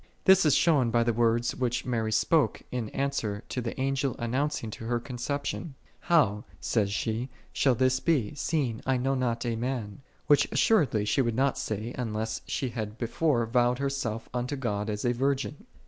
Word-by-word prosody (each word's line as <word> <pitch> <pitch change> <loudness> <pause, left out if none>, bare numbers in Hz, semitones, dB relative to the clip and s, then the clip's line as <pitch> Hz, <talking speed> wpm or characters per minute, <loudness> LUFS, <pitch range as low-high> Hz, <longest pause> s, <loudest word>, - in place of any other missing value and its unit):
This 190 -4 +6
is 140 - +5
shown 145 -8 +3
by 115 0 +3
the 120 0 +1
words 115 +1 +2
which 125 0 -1
Mary 115 -3 -1
spake 155 +7 +2
in 120 -4 -3
answer 115 -7 -2
to 125 - -2
the 115 +2 -5
Angel 135 0 0
announc 135 +5 -1
ing 110 - -5
to 115 - -8
her - - -5
her 120 -1 +1
conception; 135 +4 -4
" - - -23
How/' 120 -12 +4 0.2
saith 105 -4 +1
she, 110 +5 -2
" - - -31
shall 130 -3 +3
this 130 +2 +2
be, 140 -8 +1
seeing 140 -6 -1
I 130 -1 +3
know 135 +2 0
not 125 -3 -1
a 115 -1 0
man?"3 115 -3 -3 0.3
Which 145 -1 +4
assuredly 145 - +3
she 105 +6 +2
would 115 -3 0
not 135 +2 +2
say, 110 +3 -3
unless 110 -2 -3
she 130 - -2
had 110 -2 -5
before 120 +1 +1
vowed 120 +1 +2
herself 135 -5 -2
unto 125 +3 -2
God 105 -5 -2
as 105 +1 -3
a 120 - +3
virgin. 140 - -1
125 Hz, 195 wpm, -28 LUFS, 115-135 Hz, 0.3 s, This